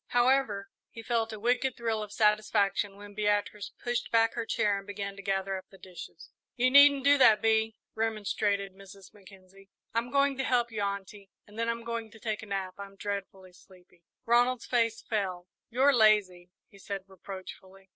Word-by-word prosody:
However, 240 -5 +2 0.2
he 230 - -10
felt 230 -1 0
a 215 - -7
wicked 245 +3 0
thrill 225 -2 -1
of 210 -1 -7
satisfaction 210 -2 +1
when 205 0 -12
Beatrice 205 0 -1
pushed 240 0 -2
back 225 0 +3
her 235 -1 -4
chair 205 -1 +1
and 195 - -14
began 200 -1 -5
to 200 - -9
gather 195 0 -1
up 185 - -11
the 195 - -16
dishes. 185 -2 -12 0.2
"You 255 0 +2
needn't 280 0 +7
do 285 0 +5
that, 220 -5 +7
Bee," 220 0 +1 0.2
remonstrated 205 -3 -1
Mrs. 195 0 -15
Mackenzie. 195 -1 -17 0.2
"I'm 230 +2 -1
going 280 0 +2
to - - +1
help 240 -2 +1
you, 215 -2 -3
Aunty, 200 0 -5 0.2
and 210 +2 -12
then 230 0 0
I'm 230 0 -3
going 230 -1 -4
to 225 +1 -16
take 215 -1 -3
a 220 - -10
nap. 195 -2 -3
I'm 200 0 -9
dreadfully 195 -2 -6
sleepy." 180 -1 -21 0.2
Ronald's 240 +1 +3
face 230 -2 0
fell. 185 -5 -3 0.2
"You're 265 +4 +4
lazy," 205 -6 +3 0.2
he 200 - -18
said 195 0 -5
reproachfully. 190 0 -11
210 Hz, 180 wpm, -29 LUFS, 195-230 Hz, 0.2 s, needn't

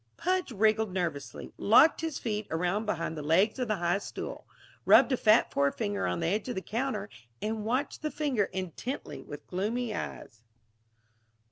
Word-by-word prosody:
Pudge 365 -4 0
wriggled 220 -1 +2
nervously, 170 -7 -4
locked 265 +11 +6
his 325 -2 -2
feet 215 -2 -3
around 180 +6 -1
behind 165 -4 -2
the 155 - -5
legs 185 - +2
of 250 - -1
the 215 - +1
high 175 +1 0
stool, - - -7 0.4
rubbed - - +6
a - - +4
fat 220 -1 +4
forefinger 200 +9 0
on - - -2
the - - 0
edge 205 +7 -1
of 245 - -3
the 190 - -2
counter, 225 -3 -2 0.3
and 215 0 -3
watched 255 +6 -1
the 305 - -1
finger 280 -10 0
intently 190 - -5
with 145 - -10
gloomy 215 +5 -2
eyes. 115 - -6
210 Hz, 165 wpm, -29 LUFS, 180-245 Hz, 0.4 s, locked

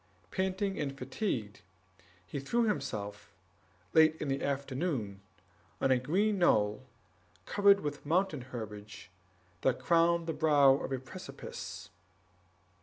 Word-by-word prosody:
Panting 190 +1 -1
and 140 -2 -3
fatigued, 115 - -3 0.6
he 140 - -5
threw 235 - +1
himself, 105 - -3 0.6
late 160 -1 +6
in 150 - -3
the 135 0 -1
afternoon, 135 - -2 0.6
on 135 - +2
a 130 - +4
green 195 +10 +1
knoll, 105 -9 +3 0.6
covered 200 -1 +5
with 145 -1 -4
mountain 165 -2 +1
herbage, 105 -5 -8 0.5
that 130 - +2
crowned 170 0 +3
the 165 - -2
brow 150 -3 +5
of 135 - -3
a 135 - 0
precipice. 130 0 -8
145 Hz, 115 wpm, -32 LUFS, 125-175 Hz, 0.6 s, late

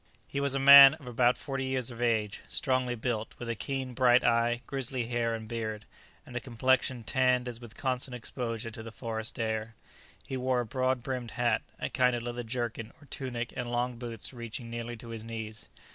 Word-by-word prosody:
He 140 - -3
was 140 -1 +2
a - - +1
man 140 +1 +11
of 145 -5 -14
about 125 +1 +3
forty 135 -2 -3
years 130 -2 -1
of 120 0 -8
age, 110 -4 0
strongly 130 -3 0
built, 115 -1 -3
with 120 - -7
a 115 - 0
keen, 130 +5 -4
bright 125 0 +5
eye, 120 0 +2
grizzly 130 -2 -2
hair 115 -1 0
and 110 -1 -7
beard, 110 -2 -4 0.4
and 120 - -11
a - - 0
complexion 130 0 +1
tanned 125 0 +2
as 120 -1 -6
with 120 -2 -11
constant 130 -1 -1
exposure 115 -1 -4
to 110 - -8
the 115 0 -8
forest 110 -1 -4
air. 110 0 -2 0.5
He 130 - -4
wore 130 0 +1
a - - -4
broad 130 +1 0
brimmed 125 -2 -3
hat, 120 -3 +2 0.2
a - - -1
kind 125 -1 +2
of 120 - -4
leather 120 0 -4
jerkin, 115 -1 -4
or 145 - -16
tunic, 120 -3 -4
and 120 -1 -3
long 120 0 -1
boots 120 0 -6
reaching 115 0 -6
nearly 120 0 -5
to 115 +1 -10
his 115 -1 -6
knees. 110 -1 -6
120 Hz, 205 wpm, -30 LUFS, 115-130 Hz, 0.5 s, man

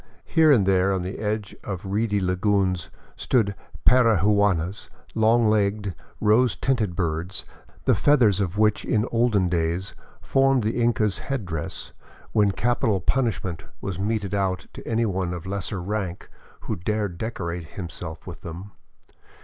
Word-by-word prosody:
Here 160 -2 +4
and 110 -9 +5
there 95 0 +3
in 90 - -2
the 95 +2 -5
edge 105 -1 -3
of 95 0 -5
reedy 105 +1 0
lagoons 95 -1 +1 0.3
stood 110 -6 +1 0.3
parihuanas, 105 -6 +3
— - - -28
long 115 +1 +4
legged, 100 -2 +1 0.3
rose 110 +3 +3
tinted 110 -9 0
birds 85 +1 -2 0.4
the - - +5
feathers 115 -9 +4
of 95 0 -2
which 105 -1 +3
in 110 -1 +1
olden 115 -5 +2
days 85 +2 -1 0.3
formed 135 -2 +2
the 110 +3 0
Inca's 110 -4 +1
head 135 -7 -3
dress, 80 -4 -5 0.4
when 105 -2 +3
capital 110 -1 +1
pun 135 +5 +1
ishment 95 -5 -4 0.2
was 100 -4 -4
meted 100 -1 -1
out 95 -2 0
to - - -10
anyone 95 -6 0
of 85 0 -8
lesser 100 +1 -3
rank 95 -1 -4 0.3
who - - -3
dared 100 -1 -2
decorate 90 -7 -4
himself 85 -3 -6
with - - -9
them. 90 +5 -8
100 Hz, 145 wpm, -24 LUFS, 90-110 Hz, 0.4 s, and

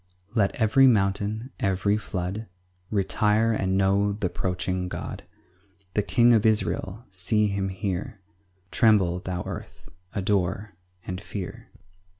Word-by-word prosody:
5 - - -25
Let 100 -4 +2
every 130 +4 +5
mountain, 105 +2 +1
every 100 0 +1
flood, 100 +1 -4 0.4
Retire 105 +2 +2
and 95 -3 0
know 100 +1 +2
th' - - -9
approaching 90 0 -1
God, - - -5 0.7
The 105 - +2
king 120 +3 +4
of 110 -2 +4
Israel: 110 0 0
see 100 +4 +1
him 100 -1 -1
here; 95 +3 -4 0.5
Tremble, 95 -6 +4
thou 90 -1 -4
earth, - - -8 0.3
adore 100 0 0 0.3
and 90 0 -5
fear. 100 -3 -7
100 Hz, 125 wpm, -26 LUFS, 95-110 Hz, 0.7 s, every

